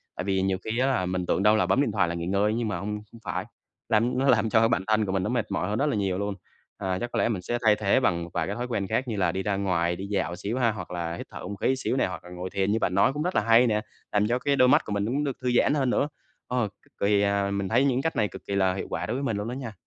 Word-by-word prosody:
Tại - - -4
vì 95 0 0
nhiều 95 0 +1
khi 110 +2 -2
á 130 - +3
là 125 -9 +1
mình 90 0 -2
tưởng 90 +2 0
đâu 105 +1 +6
là 110 - +2
bấm 95 +9 +2
điện 140 - +1
thoại 100 -3 +2
là 85 - -3
nghỉ 85 0 -4
ngơi 100 +3 +1
á - - -1
nhưng 120 -1 -1
mà 100 - -2
hông 100 +4 -4 0.2
hông 115 - -13
phải, 100 - -3 0.4
làm 115 +2 +2
nó 135 +2 +2
làm 110 -3 +4
cho 110 - +4
cái 115 0 +4
bản 95 - +1
thân 110 0 +2
của 95 - -2
mình 95 -1 0
nó - - -1
mệt 120 -3 -1
mỏi 90 - -1
hơn 105 - -1
rất 140 - +2
là 145 - 0
nhiều 95 -3 0
luôn. 100 0 -2 0.4
À, 95 -2 -2
chắc 120 0 -4
có - - -1
lẽ - - +2
mình 105 -6 -2
sẽ 120 +6 -2
thay 105 -1 +6
thế 105 +3 +2
bằng 85 -9 +1
một 85 - -8
vài - - -1
cái 100 - -3
thói 125 +1 -3
quen 100 -5 -2
khác 110 +6 -1
như 115 - -2
là 95 - +2
đi 95 - -3
ra 100 0 0
ngoài, 90 -3 0
đi 95 - -6
dạo 100 -3 -1
xíu 105 +7 -3
há, 120 -3 +3
hoặc 95 -5 -7
là 85 -1 -3
hít - - -7
thở - - -8
không 100 +3 -5
khí 130 +7 +1
xíu 130 - -2
nè - - +3
hoặc 95 - -6
là 90 - -12
ngồi 90 +1 -6
thiền 100 +1 0
như 110 - +1
bạn 90 - 0
nói 100 +7 +4
cũng 150 +2 -2
rất 180 +2 -2
là - - +4
hay 115 +3 +5
nè. 105 -2 +1 0.3
Làm 105 0 +2
cho 120 +2 +1
cái 140 +2 +1
đôi 130 -2 +5
mắt 150 +5 +4
của - - -6
mình 100 0 0
nó - - -2
cũng 145 +3 0
được 140 -3 -2
thư 125 -1 0
giãn - - +3
hơn 135 -4 +1
nữa, 135 - +1 0.4
ơ, 125 -3 0
cực - - -29
kỳ 100 0 +3
à, 100 -1 +1
mình 100 -1 -2
thấy 120 +6 +3
những 130 -1 +2
cách 160 +2 -1
này 110 -4 +2
cực 90 - -10
kỳ 100 - -2
là 95 -1 +2
hiệu 95 - -4
quả - - -2
đối 110 - -2
với 135 - -3
mình 115 -6 -1
luôn 105 +1 -3
đó 120 - -4
nha! 125 -4 -6
105 Hz, 355 wpm, -26 LUFS, 95-120 Hz, 0.4 s, đâu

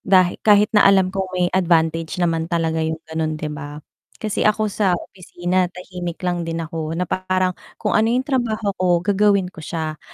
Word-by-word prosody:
dahi 185 -2 +3
kahit 210 0 +4
na 210 -2 +6
alam 190 -1 +4
kong 190 -1 -2
may 180 -1 +2
advantage 165 -3 +1
naman 165 -2 0
talaga 165 -1 0
yung 160 0 -1
ganon, 160 -1 -2
'di 155 0 -4
ba? 145 0 -7 0.4
Kasi, 215 -1 0
ako 215 +1 +1
sa 190 -4 +2
opisina 180 0 -2
tahimik 180 -1 -7
lang 175 -1 0
din 165 -1 -3
ako 160 -1 -4
na 180 - 0
parang 185 +1 0 0.2
kung - - -2
ano 220 +1 +3
'yung 250 +3 +1
trabaho 225 -7 -1
ko 185 - +2 0.2
gagawin 200 -2 +2
ko 165 - -11
siya, 155 -1 -4
180 Hz, 185 wpm, -21 LUFS, 165-195 Hz, 0.4 s, na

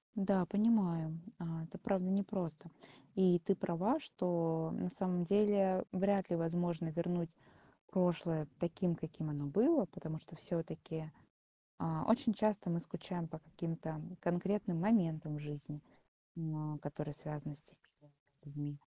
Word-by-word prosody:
Да, 195 -3 +3
понимаю, 180 -7 +3 0.2
а, 165 -2 -4
это 160 - -9
правда 190 -4 +1
непросто. 190 -5 -1 0.5
И 185 -2 +6
ты 190 +3 +2
права, 190 - +1
что 165 - 0
на 180 - -1
самом 180 -1 0
деле 200 0 +4
вряд 195 0 +2
ли 175 - +2
возможно 170 0 0
вернуть 170 +1 0 0.6
прошлое 170 -4 +2
таким, 175 +1 +1
каким 160 -1 -5
оно 145 -1 -2
было, 225 - +4
потому 160 -2 -6
что 165 - -14
всё-таки, 160 -1 -4 0.7
а, 160 -1 -1
очень 230 +1 +4
часто 210 -2 +1
мы 170 0 +1
скучаем 175 0 -5
по 160 0 -8
каким-то 160 0 -5 0.2
конкретным 180 +1 0
моментам 165 -8 +3
жизни, 150 0 -7 0.6
м, 155 -2 -3
а, - - -6
которые 145 0 -5
связаны 150 -1 -6
с 145 - -15
теми - - -21
этими 150 0 -27 0.3
людьми. 145 0 -5
170 Hz, 135 wpm, -37 LUFS, 160-190 Hz, 0.7 s, И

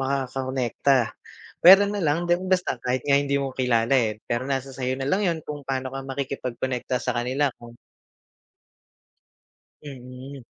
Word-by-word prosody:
makakonekta, 130 -3 0 0.5
pwera 195 +3 +9
na 205 0 -2
lang 165 +1 +1
di 175 - +1 0.2
basta 180 -9 0
kahit 125 +1 -2
nga 140 -1 +4
hindi 140 0 0
mo 135 -1 -2
kilala, 120 -2 +1
eh, 115 -5 +2
pero 120 +3 -2
nasa 135 0 -2
sa'yo 130 0 -2
nalang 140 +9 0
yun 165 -2 -1
kung 150 -1 -6
pano 130 -1 -2
ka 135 - -4
makikipagkonekta 130 -2 -3
sa 125 0 -2
kanila 130 +3 0
kung 120 0 -13 2.1
Mm. 130 -1 -10
135 Hz, 140 wpm, -24 LUFS, 125-140 Hz, 2.1 s, pwera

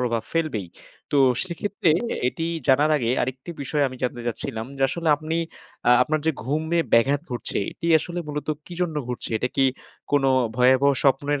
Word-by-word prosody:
প্রভাব 120 -2 0
ফেলবেই। 155 - -1 0.5
তো 145 - +4 0.3
সেক্ষেত্রে 185 +1 -2 0.4
এটি 165 - -4 0.2
জানার 145 +4 +4
আগে, 120 -5 0
আরেকটি 130 +5 -4
বিষয় 145 +2 0
আমি 130 - -9
জানতে 125 -1 -2
চাচ্ছিলাম, 115 -1 -4
যে 135 - -2
আসলে 170 +2 -2
আপনি 155 +2 -3 0.5
আ - - +7
আপনার 155 +4 0
যে - - +5
ঘুমে 155 +6 0
ব্যাঘাত 135 +5 +4
ঘটছে, 120 - -2
এটি - - -6
আসলে 175 +3 -5
মূলত 150 0 -4 0.2
কী 175 - -8
জন্য 165 -3 -2
ঘটছে? 125 - -4
এটা 125 - -1
কি 135 - +4 0.5
কোন 145 -1 +3 0.3
ভয়াবহ 130 +3 +5
স্বপ্নের 140 +1 +2
140 Hz, 170 wpm, -24 LUFS, 125-155 Hz, 0.5 s, আ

